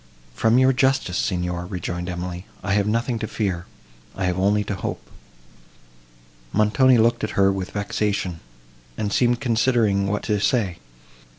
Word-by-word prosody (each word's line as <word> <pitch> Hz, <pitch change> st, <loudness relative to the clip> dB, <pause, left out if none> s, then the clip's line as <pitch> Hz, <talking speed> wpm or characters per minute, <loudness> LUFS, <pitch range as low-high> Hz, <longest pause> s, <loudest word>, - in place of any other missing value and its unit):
"From 110 Hz, -, +3 dB
your 130 Hz, +1 st, +5 dB
justice, 130 Hz, -7 st, +1 dB
Signor," 90 Hz, -2 st, -2 dB
rejoined 90 Hz, -1 st, -4 dB
Emily, 90 Hz, +2 st, -5 dB, 0.2 s
"I 100 Hz, -, 0 dB
have 100 Hz, 0 st, +2 dB
nothing 115 Hz, +2 st, 0 dB
to 110 Hz, -, -3 dB
fear—I 90 Hz, -, -5 dB
have 90 Hz, 0 st, 0 dB
only 105 Hz, +2 st, +2 dB
to 105 Hz, -, -4 dB
hope." 95 Hz, -, -5 dB, 1.4 s
Montoni 120 Hz, +5 st, +4 dB
looked 115 Hz, +1 st, +2 dB
at 110 Hz, -, -3 dB
her 100 Hz, 0 st, +5 dB
with 95 Hz, -1 st, -4 dB
vexation, 100 Hz, -4 st, -2 dB, 0.6 s
and 105 Hz, -1 st, -2 dB
seemed 120 Hz, 0 st, +2 dB
considering 115 Hz, -5 st, +2 dB
what 105 Hz, +1 st, -1 dB
to 105 Hz, -2 st, 0 dB
say. 100 Hz, -5 st, 0 dB
100 Hz, 140 wpm, -23 LUFS, 90-115 Hz, 1.4 s, your